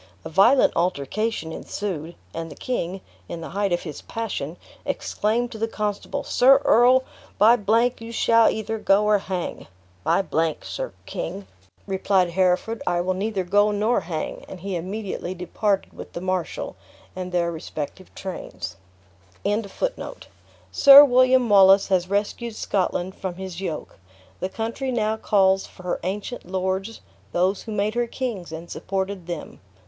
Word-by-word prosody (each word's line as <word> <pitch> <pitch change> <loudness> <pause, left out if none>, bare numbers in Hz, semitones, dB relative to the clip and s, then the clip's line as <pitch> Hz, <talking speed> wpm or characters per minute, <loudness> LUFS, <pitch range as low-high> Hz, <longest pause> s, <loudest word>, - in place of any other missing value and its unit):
A - - -5
violent 215 - +5
altercation 180 +3 -1
ensued; 170 -2 -5 0.2
and 165 0 -5
the - - -10
king, 190 -7 -3 0.3
in 165 - -5
the 160 - -6
height 200 +1 0
of 175 - 0
his 155 -4 -7
passion, 180 -8 -4 0.3
exclaimed 235 +3 -1
to 220 - -8
the 225 - 0
constable, 215 +6 -3
"Sir 270 +2 +5
Earl, 250 +3 +6 0.3
by 220 +4 +7
G, 230 +3 +2
you 230 - -7
shall 230 0 +4
either 220 0 -3
go 205 0 +3
or 210 -1 +4
hang." 185 -2 -4 0.4
"By 195 - +2
G, 160 -2 0
Sir - - -5
King," 100 - -5 0.4
replied 190 -2 +1
Hereford, 185 +5 +1
"I 175 -1 +2
will 185 +2 0
neither 195 0 -2
go 205 +3 +3
nor 210 +3 +1
hang." 160 -2 -5
And 185 - -9
he 195 0 -3
immediately 185 0 -4
departed 195 +3 -1
with - - -10
the - - -4
marshal 185 -1 -3 0.4
and 180 0 -5
their 170 -1 +1
respective 160 +2 -6
trains. 95 - -6 1.9
"Sir 280 +1 +10
William 255 -1 +4
Wallace 195 -1 +6
has 185 -1 +1
rescued 210 +3 -1
Scotland 185 -2 -1
from 185 -2 -5
his 190 -1 -7
yoke. 160 - -5 0.4
The 185 - -2
country 230 +6 -3
now 220 -2 0
calls 195 -3 +3
for 185 - -15
her 180 - -2
ancient 205 +7 -4
lords 190 +3 -2 0.3
those 185 +3 +1
who 225 - -8
made 210 +1 0
her 240 0 0
kings, 230 -10 -4
and 165 +1 -7
supported 190 -1 -4
them. 170 -3 -6
195 Hz, 150 wpm, -24 LUFS, 180-220 Hz, 1.9 s, Sir